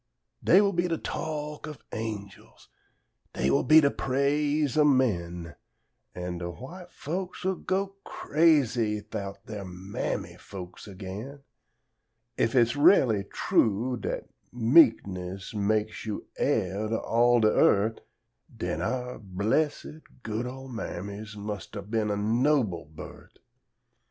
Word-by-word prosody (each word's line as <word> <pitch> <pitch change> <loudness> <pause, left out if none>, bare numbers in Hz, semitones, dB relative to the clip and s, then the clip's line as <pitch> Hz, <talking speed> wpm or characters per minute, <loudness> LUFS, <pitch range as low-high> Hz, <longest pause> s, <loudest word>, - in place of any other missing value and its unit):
Dey 190 - +6
will 200 -1 +2
be 175 0 +1
de 165 -1 -1
talk 150 -1 -4
of 150 -3 -9
angels, 105 -3 -7 0.6
dey 65 - +1
will - - +4
be 155 +5 +7
de 140 -1 +3
praise 145 +1 +1
o' 155 - +5
men, 90 - +1 0.6
An' 90 -1 -4
de 85 -1 -4
whi' 175 - -9
folks 180 +4 -5
would 190 -1 -2
go 195 +1 -1
crazy 125 -9 +2
'thout 100 -2 -7
their 105 -2 -6
Mammy 95 +2 -4
folks 90 +1 -10
again: 105 +8 -8 0.9
If 115 +2 +1
it's 115 -2 +4
r'ally 135 - +5
true 115 +4 +1
dat 120 - -3 0.3
meekness 110 - +3
makes 105 +1 0
you 105 - -4
heir 100 +4 0
to 115 +1 0
all 120 +1 +3
de 110 -1 +4
eart', 110 +3 +3 0.6
Den 80 - -2
our 125 +5 -3
blessed, 110 +11 -1 0.2
good 110 +3 -3
ol' 130 +1 -8
Mammies 105 -2 -6
must 105 +1 -6
'a' 100 - -5
been 105 +1 -1
of 100 - 0
noble 115 - +1
birt'. 75 0 -12
115 Hz, 125 wpm, -28 LUFS, 100-145 Hz, 0.9 s, be